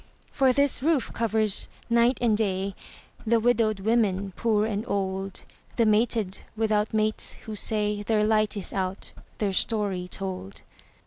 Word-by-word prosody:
For 265 -2 +3
this 280 0 +1
roof 300 -3 +1
covers, 220 -2 +1 0.2
night 235 +2 +3
and 230 -3 +3
day, 195 -2 -1 0.5
The 230 0 +3
widowed 220 -3 +2
women 200 -3 +1
poor 215 -2 +1
and 210 -1 -2
old, 195 -1 -3 0.3
The 230 - +3
mated 215 -2 +1 0.2
without 215 -1 +1
mates, 215 0 0
who 220 - -5
say 210 0 0
Their 210 0 +1
light 215 -1 +2
is 200 - -4
out, 190 0 -3 0.3
their 200 -3 -1
story 195 -4 0
told. 185 - -6
215 Hz, 140 wpm, -26 LUFS, 195-225 Hz, 0.5 s, For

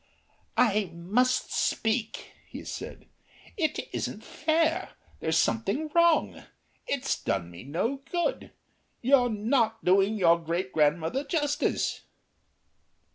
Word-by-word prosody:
"I 210 -5 +3
must 225 +10 +1
speak," 225 0 -1 0.2
he - - -9
said. - - -7 0.5
"It 315 -6 -1
isn't - - -4
fair. 320 +1 0 0.3
There's 160 0 0
something 200 - 0
wrong. 340 -1 +3 0.5
It's 275 -1 -1
done 85 -3 -2
me 85 - -10
no 175 - -1
good. 350 +7 -1 0.5
You're 255 -1 +4
not 225 +1 0
doing 195 +4 +4
your 170 -3 +4
great 170 +3 -3
grandmother 160 - +1
justice." 290 0 0
220 Hz, 105 wpm, -28 LUFS, 170-280 Hz, 0.5 s, You're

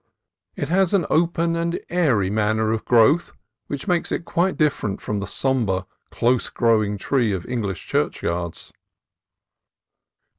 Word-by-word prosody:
It - - -4
has 190 +2 +3
an 190 - +2
open 170 0 +2
and 170 +1 -1
airy 130 - +1
manner 110 +1 +1
of 110 -1 -2
growth 125 +8 +4 0.3
which 140 +3 -5
makes 175 -2 0
it - - -2
quite 180 +3 0
different 120 -10 0
from 105 -1 -3
the 100 - -4
sombre, 110 -10 0 0.2
close 125 +1 +1
growing 110 -3 +1
tree 120 +2 +1
of 90 -2 -4
English 100 -7 -3
churchyards. 85 0 -2
120 Hz, 135 wpm, -22 LUFS, 105-165 Hz, 0.3 s, growth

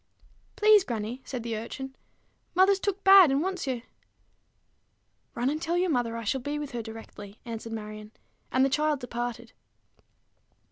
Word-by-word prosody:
"Please, 425 -2 +6
grannie," 235 - -4
said 250 -4 -5
the 230 -1 -3
urchin, 265 +4 -6 0.6
"mother's 380 +2 +5
took 400 0 -2
bad, 385 -4 +9
and 275 +3 +1
want's 370 -5 -3
ye." 250 -3 -2 1.5
"Run 240 +1 0
and 305 +1 -3
tell 335 +2 0
your 360 -1 +1
mother 240 -4 0
I 230 - -5
shall 255 +5 -1
be 290 +4 -3
with 295 -2 -5
her 240 -2 -3
directly," 220 -2 -10
answered 230 -1 -6
Marion; 215 -1 -7 0.4
and 260 +1 +4
the - - +2
child 300 +1 +1
departed. 240 -1 -5
255 Hz, 155 wpm, -28 LUFS, 230-310 Hz, 1.5 s, bad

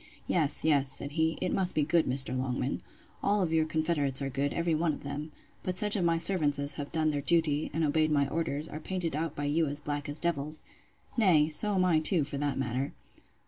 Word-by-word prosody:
Yes, 155 -5 +1
yes, 140 -4 +3
said 140 - +3
he, 160 +1 0
it 185 - -1
must 185 -2 +1
be 150 - +2
good 160 +2 +2
Mr. 130 0 +3
Longman! 130 +1 -2 0.4
All 200 -2 +2
your 160 -1 +1
confederates 155 -4 +2
are 135 -1 -3
good, 140 +2 -1
every 170 -1 -1
one 160 0 +1
of - - -9
them: 145 +2 -5 0.3
but 185 -1 -4
such 210 +1 +3
of 195 - 0
my 165 -1 +2
servants 165 -5 +2
as 140 0 -2
have 145 0 -6
done 155 -1 +1
their 145 -1 -2
duty, 155 -1 +1
and 160 - -1
obeyed 155 +1 +2
my 140 -2 +2
orders, 150 0 -2
are 155 - -7
painted 170 -2 -3
out 160 0 -3
by 145 - -3
you 155 +2 +1
as 145 +1 -3
black 145 0 -4
as 145 +1 -3
devils! 155 -2 -2 0.5
nay, 165 -9 +4
so 205 +6 0
am 185 -1 +2
I 165 -3 +3
too, 160 0 +2
for 140 0 -5
that 145 -1 -1
matter. 135 +2 -2
155 Hz, 225 wpm, -29 LUFS, 145-165 Hz, 0.5 s, nay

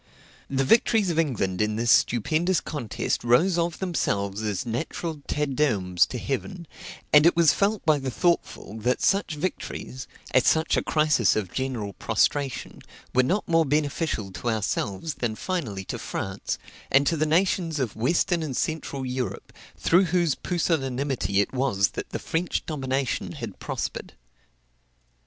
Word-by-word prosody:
The 135 0 +1
victories 220 - +3
of 165 - 0
England 105 - 0
in 105 0 +1
this 115 +1 +2
stupendous 160 - +3
contest 130 -9 -3
rose 165 +10 +3
of 170 -1 -1
themselves 100 - -1
as 105 0 -2
natural 150 +6 -4
Te 150 0 0
Deums 110 - +2
to 125 - -5
heaven; 170 - -4 0.5
and 150 +2 +8
it 170 - +4
was 170 -2 +5
felt 205 +1 0
by 155 -2 +4
the 135 -1 -3
thoughtful 150 - -1
that 125 +3 0
such 195 -5 +2
victories, 145 -5 -5 0.3
at 130 - +5
such 160 +1 +3
a - - +2
crisis 150 - +2
of 100 -4 -3
general 125 -7 -3
prostration, 140 +7 -1 0.3
were 130 - +5
not 185 +11 0
more 165 -1 +4
beneficial 145 - -1
to 120 - -3
ourselves 110 +4 -2
than 115 -3 -1
finally 110 - -3
to - - -5
France, 95 +1 -4 0.3
and 140 +1 +4
to 165 - +2
the 155 0 +1
nations 165 -1 +1
of 125 -6 -2
western 170 +8 +1
and 145 -5 -3
central 145 -4 -2
Europe, 125 -1 -4 0.2
through 180 +3 +4
whose 170 -3 +2
pusillanimity 135 - 0
it 100 - -3
was 125 -7 +2
that - - -6
the - - -3
French 170 +2 -2
domination 135 -4 -2
had 115 - -7
prospered. - - -4
140 Hz, 150 wpm, -25 LUFS, 115-165 Hz, 0.5 s, and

